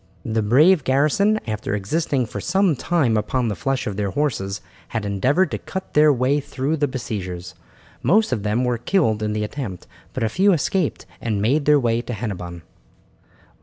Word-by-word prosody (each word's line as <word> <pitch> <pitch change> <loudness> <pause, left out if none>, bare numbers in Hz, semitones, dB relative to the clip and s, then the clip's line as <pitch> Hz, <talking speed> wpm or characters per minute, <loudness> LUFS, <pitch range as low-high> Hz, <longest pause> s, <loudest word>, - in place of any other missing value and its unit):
The 110 0 0
brave 150 - +5
garrison, 150 +12 +2
after 110 -1 -2
existing 130 +5 0
for 110 - -6
some 190 -2 +2
time 135 -5 +1
upon 115 +3 0
the 105 - -2
flesh 135 +9 -1
of 100 -2 -4
their 100 -1 -1
horses, 100 -5 -1 0.3
had 110 -3 -3
endeavoured 130 - +1
to - - -3
cut 190 0 -7
their 150 0 +6
way 135 +2 +2
through 140 +2 -2
the 145 -1 +1
besiegers. 90 - -5 0.5
Most 215 0 +3
of 120 -5 0
them 105 +4 0
were 125 -2 0
killed 115 - +1
in 105 0 -1
the 105 0 -1
attempt, 105 -5 -5 0.3
but - - -2
a - - +2
few 190 - +3
escaped 170 +1 -1 0.2
and 110 -3 -1
made 135 +8 +1
their 150 -1 +5
way 115 -2 +1
to 120 +1 -6
Hennebon. 90 -6 -5
125 Hz, 180 wpm, -22 LUFS, 105-150 Hz, 0.5 s, their